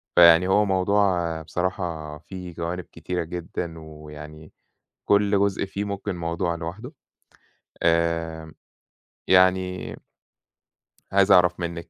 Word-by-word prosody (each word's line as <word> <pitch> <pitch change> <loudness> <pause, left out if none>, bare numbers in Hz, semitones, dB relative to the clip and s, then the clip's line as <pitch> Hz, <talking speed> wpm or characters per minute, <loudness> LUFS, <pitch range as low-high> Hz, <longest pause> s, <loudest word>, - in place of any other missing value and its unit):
فيعني 85 +1 +7
هو 105 +2 +3
موضوع 95 -4 +1
بصراحة 85 -3 -3
فيه 90 +2 -9
جوانب 85 +2 -4
كتيرة 85 +2 -4
جدًا، 85 0 -6
ويعني 75 0 -11 0.5
كل 100 0 +3
جزء 100 -1 +1
فيه 100 +1 -4
ممكن 100 -1 -4
موضوع 85 0 -2
لوحده، 95 - -7 0.9
آمم، 85 -1 0 0.7
يعني 90 0 +2 1.2
عايز 100 +1 +4
أعرف 90 -1 +5
منِّك 85 -1 -5
85 Hz, 100 wpm, -24 LUFS, 80-95 Hz, 1.2 s, فيعني